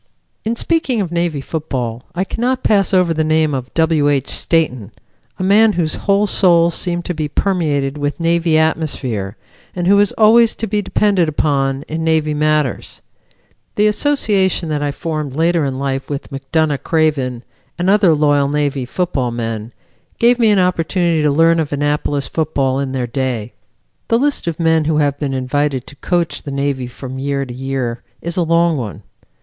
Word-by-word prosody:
In 225 +2 -1
speaking 280 -4 0
of 185 -5 -2
Navy 170 -4 -1
football 130 -6 -4
I 180 - 0
cannot 250 +6 -2
pass 200 -3 +2
over 180 -3 +3
the 155 0 0
name 155 -1 +1
of 130 -1 -4
W. 160 -3 +2
H. 140 -2 0
Stayton, 130 - 0 0.5
a - - -3
man 210 +3 +4
whose 165 -4 0
whole 200 +1 +1
soul 170 -4 +3
seemed 175 +1 -2
to 180 - -2
be 155 -2 -3
permeated 150 -5 -1
with 145 +2 -2
Navy 165 -1 +2
atmosphere, 130 -10 -1 0.4
and 175 -1 -2
who 200 +2 +5
is 205 -1 +3
always 225 +1 +5
to 225 - -3
be 210 0 -1
depended 195 -5 +1
upon 140 -2 0
in 160 +1 -4
Navy 160 -2 +1
matters. 150 -3 -1 0.7
The 210 - +3
association 210 - +1
that 150 -1 -1
I 145 - 0
formed 150 -2 -4
later 165 +1 +2
in 135 -1 -3
life 135 0 -3
with 140 -1 -5
McDonough 140 +2 -1
Craven 140 -7 0 0.3
and 175 +1 -1
other 195 -5 +4
loyal 145 -2 +2
Navy 145 -3 -1
football 140 -4 -1
men 115 -1 -4 0.5
gave 240 +1 +3
me 225 -2 +4
an 205 - +4
opportunity 175 -2 +1
to 150 - +2
learn 165 +3 +3
of 155 -3 -2
Annapolis 145 -1 -1
football 140 -4 -1
in 140 -1 -2
their 130 -2 -1
day. 120 -2 -3 0.5
The 230 - +3
list 280 -5 0
of 165 -1 -3
men 160 -2 +2
who 155 0 +1
have 145 -2 +1
been 140 -3 -2
invited 130 0 -1
to - - -12
coach 175 +2 -1
the - - -8
Navy 140 -2 -2
from 130 +1 -8
year 140 0 -2
to 125 - -8
year 130 -2 -3 0.2
is 170 0 -3
a 180 - +1
long 165 -1 +2
one. 110 -4 -6
155 Hz, 175 wpm, -17 LUFS, 135-175 Hz, 0.7 s, who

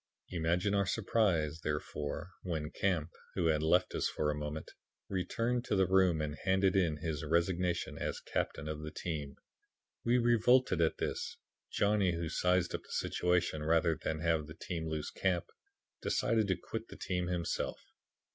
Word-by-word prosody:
Imagine 90 +3 +1
our 100 -1 +2
surprise, 90 -8 +1
therefore, 75 +3 -3
when 80 -4 -3
Camp, 85 -5 0 0.2
who 85 - +1
had 75 -1 +2
left 90 +4 +3
us - - +1
for 75 -1 0
a - - -3
moment, 75 +1 -5 0.4
returned 115 +6 0
to - - 0
the 95 -1 +4
room 90 -3 +4
and 75 0 -4
handed 95 0 +3
in 85 -6 +2
his 80 -1 -3
resignation 85 +2 0
as - - -2
captain 75 - -2
of 75 0 -4
the 75 - -5
team. 75 -4 -4 0.7
We 120 +1 +3
revolted 120 -3 +4
at 80 - +2
this. - - -3 0.3
Johnny, 100 -3 +2
who 85 -1 -2
sized 90 +1 +2
up - - -2
the - - -21
situation, 90 -3 +1
rather 80 +1 +3
than 80 +1 -3
have 80 -2 +1
the 80 - -9
team 85 -2 -4
lose 75 -1 -3
Camp, 90 -3 0 0.6
decided 110 -2 +2
to 95 - +2
quit - - -6
the - - -11
team 90 -1 -2
himself. 90 -2 -2
85 Hz, 165 wpm, -33 LUFS, 80-95 Hz, 0.7 s, the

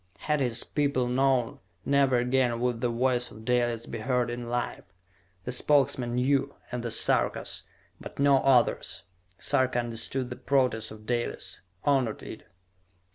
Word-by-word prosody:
Had 150 -1 0
his 120 -3 +1
people 140 -4 0
known, 130 -1 +1 0.3
never 140 -2 +3
again 125 -1 +1
would 120 -1 -1
the 120 - +1
voice 125 +1 0
of 110 +1 -13
Dalis 120 -2 0
be - - -6
heard 125 +1 0
in 120 0 -5
life. 120 0 -3 0.6
The 125 - -4
Spokesmen 130 -2 +2
knew, 135 +2 +1 0.2
and 125 -1 -3
the 120 - -3
Sarkas; 115 - +1 0.3
but - - -10
no 140 -1 +5
others. 130 -3 +2 0.3
Sarka 130 +4 +1
understood 120 +2 0
the - - -4
protest 125 -5 +1
of 110 0 -12
Dalis; 120 -5 -2 0.2
honored 130 -6 +1
it. - - -9
125 Hz, 145 wpm, -28 LUFS, 120-135 Hz, 0.6 s, no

